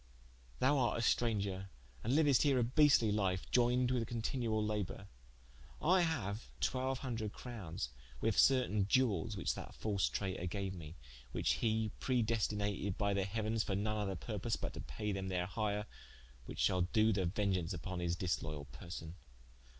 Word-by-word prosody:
Thou 140 +2 +3
art 120 - +2
a - - -1
straunger 100 -6 +1 0.4
and 115 - 0
liuest 145 -4 +5
here 140 -3 +4
a 125 - +3
beastly 125 -3 +5
life, 95 -3 0
ioyned 125 +1 +3
with 120 -3 0
continuall 115 -2 -1
labour: 105 -1 -3 0.7
I 180 +3 +4
haue 120 - 0 0.2
twelve 130 0 0
hundred 110 -4 -3
crownes 90 - -5 0.3
with 110 -2 +1
certaine 125 -7 +4
Iewelles, 105 -8 +2
which - - 0
that - - -8
false 100 - 0
traitour 95 0 -2
gaue 95 0 -3
me, 80 -2 -9 0.4
which - - +1
he 110 -1 +1
predestinated 105 -5 0
by 100 -1 +1
the 100 -1 +1
heauens 110 +2 -1
for 95 - -1
none 110 +2 0
other 100 -2 -1
purpose - - -2
but - - -4
to - - -6
paie 105 - -4
them 95 -1 -3
their 90 -1 0
hire, 105 +2 -1 0.6
which - - -7
shall 90 - +2
do 110 +5 +3
the 95 -3 +1
vengeaunce 95 -3 0
vpon 90 +1 -4
his 85 0 0
disloyall 75 -4 -2
persone. 85 -2 -7
105 Hz, 160 wpm, -36 LUFS, 95-120 Hz, 0.7 s, liuest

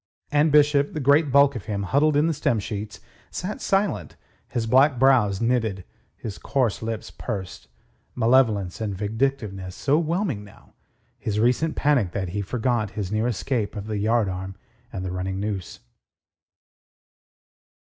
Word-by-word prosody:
And 150 +1 +3
Bishop, 145 -1 +4
the 155 - -3
great 145 +1 +3
bulk 140 0 +5
of 115 - -6
him 100 -2 -2
huddled 145 +9 +2
in 150 - +4
the 165 - +1
stern 130 -6 0
sheets, 105 0 -6 0.3
sat 190 +4 -5
silent, 195 +1 0 0.3
his 115 -2 -2
black 130 +4 +4
brows 120 -7 +4
knitted, 115 -5 0 0.3
his 105 -4 -7
coarse 130 -6 0
lips 110 -1 -4
pursed, 95 -3 -6 0.5
malevolence 115 -6 +2
and 100 -3 -3
vindictiveness 105 -4 -2
so 145 +2 +2
whelming 165 - -1
now 105 - -18 0.5
his 105 -1 -2
recent 125 +8 +2
panic 130 -11 +2
that 95 -3 -2
he 100 +3 -2
forgot 115 +1 -1
his 100 -3 -3
near 110 +2 +1
escape 120 -1 -2
of 100 -1 -5
the 105 -1 -3
yardarm 95 -4 0 0.4
and 95 -1 -5
the 90 - -3
running 95 +1 -3
noose. 100 -4 -4
115 Hz, 145 wpm, -24 LUFS, 100-140 Hz, 0.5 s, bulk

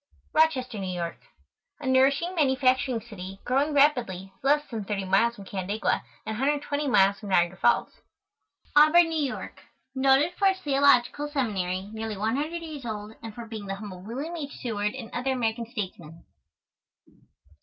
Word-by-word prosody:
ROCHESTER, 255 -8 +2
NEW 185 -2 -3
YORK. 170 -1 -4 0.6
A 290 - -8
nourishing 270 +7 +3
manufacturing 260 -5 +2
city, 195 -4 -9
growing 275 +4 +1
rapidly, 240 -11 +2
less 295 +2 +2
than 220 -3 -3
30 195 -1 -3
miles 215 +5 +3
from 200 -3 -11
Canandaigua, 195 +2 -1 0.2
and 220 - -3
120 290 +1 0
miles 200 -5 +4
from 205 - -8
Niagara 175 -1 +3
Falls. 240 - +1 0.7
AUBURN, 320 +3 +7
NEW 315 -3 0
YORK. 260 - -6 0.3
Noted 270 +5 +3
for 395 - +4
its 380 -1 +2
Theological 280 -1 +3
Seminary, 200 -9 -2
nearly 220 -1 -4
one 220 +4 0
hundred 320 +4 -3
years 305 -4 -7
old, 215 -2 -5
and 225 -2 -8
for 235 - -7
being 220 -3 -7
the 195 - -3
home 205 -1 -8
of 180 - -11
William 275 - -5
H. 290 -4 -6
Seward 210 -2 -2
and 235 -4 -8
other 260 +2 0
American 230 -2 -1
Statesmen. 175 -7 -7
240 Hz, 160 wpm, -27 LUFS, 205-285 Hz, 0.7 s, AUBURN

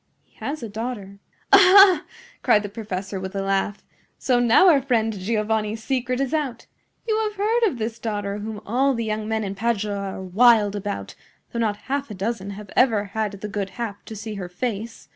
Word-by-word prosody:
He - - -36
has 285 -2 -4
a - - -3
daughter." 210 -2 -6 0.3
"Aha!" 390 -1 +8 0.4
cried 210 - +4
the 205 - -5
professor, 200 -2 -5
with 190 +1 -6
a 195 - -1
laugh. 195 +1 -1 0.3
"So 250 -2 +1
now 245 +10 +5
our 300 -6 +6
friend 230 -4 +1
Giovanni's 215 +2 -1
secret 255 -1 -1
is 275 0 -1
out. 280 -7 -2 0.4
You 435 -1 +1
have 425 -1 -2
heard 445 +4 +2
of 325 - -3
this 225 0 -4
daughter, 205 -2 -3
whom 215 0 -6
all 260 +5 +2
the 230 -1 -2
young 215 0 -2
men 220 0 -1
in 195 -1 -3
Padua 210 -1 -1 0.2
are 190 - -7
wild 210 +2 +4
about, 205 0 -4 0.4
though 235 - -2
not 215 -3 0
half 280 0 -2
a 210 - -6
dozen 200 0 -3
have 200 0 -9
ever 225 -5 +3
had 215 -2 -1
the 200 +1 -6
good 200 -1 -3
hap 220 -4 -5
to 220 - -8
see 215 +1 -6
her 190 -3 -6
face. 225 +3 -5
220 Hz, 200 wpm, -23 LUFS, 205-250 Hz, 0.4 s, Aha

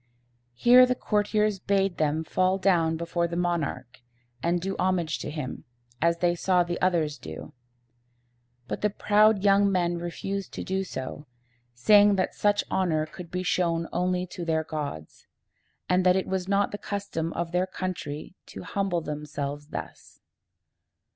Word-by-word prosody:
Here 250 - +7
the 250 - +1
courtiers 210 -2 0
bade 195 -1 +1
them 155 +1 +1
fall 185 +3 +1
down 170 -4 +2
before 170 +1 -1
the 170 - -5
monarch, 160 -9 -2 0.4
and 170 +3 +1
do 195 +2 -3
homage 180 -4 0
to - - -5
him, 150 -4 -5 0.4
as 170 +1 +3
they 175 0 +2
saw 180 +1 +2
the 175 0 -4
others 165 -5 +1
do. 80 0 -9 1.1
But - - -4
the 210 - +2
proud 210 0 +3
young 200 0 +4
men 175 -2 0
refused 190 +3 -4
to - - -5
do 190 +1 -1
so, 145 -4 -6 0.5
saying 205 - +6
that 185 -1 0
such 205 0 +2
honor 160 -5 +1
could 170 +2 -10
be 180 +1 -3
shown 170 -2 0
only 180 +1 0
to 180 0 -7
their 160 -1 0
gods, 145 - -6 0.6
and 180 0 +2
that 180 0 +5
it 190 - 0
was 190 -1 -2
not 200 0 +2
the 205 - -5
custom 200 -5 -3
of 170 -1 -3
their 180 +1 +1
country 180 -5 -5
to - - -9
humble 195 -4 -1
themselves 145 -1 -5
thus. - - -8
180 Hz, 155 wpm, -27 LUFS, 160-195 Hz, 1.1 s, Here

